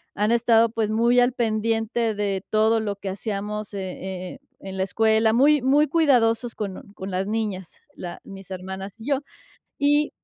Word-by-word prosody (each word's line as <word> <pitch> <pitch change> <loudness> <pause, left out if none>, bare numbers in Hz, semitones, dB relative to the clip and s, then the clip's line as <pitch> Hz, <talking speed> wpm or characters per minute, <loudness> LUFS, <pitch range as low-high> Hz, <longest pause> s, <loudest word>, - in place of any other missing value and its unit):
han 210 +2 +1
estado, 230 -1 +4
pues, 220 -2 -1
muy 235 +3 +3
al 245 +1 +3
pendiente 225 0 0
de 200 -2 -2
todo 220 +1 +3
lo 205 -2 -2
que 200 - -5
hacíamos 210 +1 -4
e 200 - -4
e 185 -1 -6 0.3
e 195 - -9
en 190 - -6
la 190 - +1
escuela, 220 +3 +2
muy 285 +4 +5
muy 285 +4 +4
cuidadosos 245 -7 +2
con 200 -1 -6
con 190 -1 -7
las 185 +1 -1
niñas, 210 -5 -3 0.2
la 175 -1 -7
mis 195 -1 -11
hermanas 190 +3 -7
y 225 - -10
yo, 280 -2 +2 0.6
y 290 +1 +3
220 Hz, 175 wpm, -24 LUFS, 195-235 Hz, 0.6 s, muy